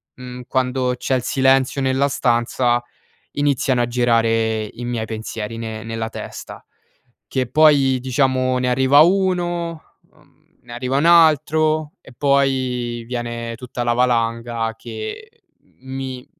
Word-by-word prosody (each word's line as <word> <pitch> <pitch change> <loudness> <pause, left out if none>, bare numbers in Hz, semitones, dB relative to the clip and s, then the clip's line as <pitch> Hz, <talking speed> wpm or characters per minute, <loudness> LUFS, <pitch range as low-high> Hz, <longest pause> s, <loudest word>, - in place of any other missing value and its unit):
m 125 - -12
mhmm, 125 0 -8
quando 130 -1 0
c'è 130 - -1
il 125 - 0
silenzio 135 +1 +2
nella 135 +1 +1
stanza 120 -1 +1 0.5
iniziano 140 -3 +1
a - - 0
girare 115 -2 +1
i 115 +3 -9
miei 120 -2 -3
pensieri 110 0 -6
ne 110 -1 -6
nella 115 0 -4
testa. - - -9 0.7
Che 130 -1 -1
poi 140 -2 +4
diciamo 130 0 +1
ne 125 0 0
arriva 130 +3 +4
uno, 175 -2 +1 0.3
mhmm, - - -28 0.2
ne 120 - -13
arriva 125 +2 -2
un 145 - 0
altro 155 -1 +3
e 135 - -16
poi 130 -4 0
viene 120 -1 -4
tutta 125 0 -6
la 120 - +2
valanga 115 -1 0
che 115 - -7 0.5
mi 130 -1 -6
125 Hz, 130 wpm, -20 LUFS, 120-140 Hz, 0.7 s, poi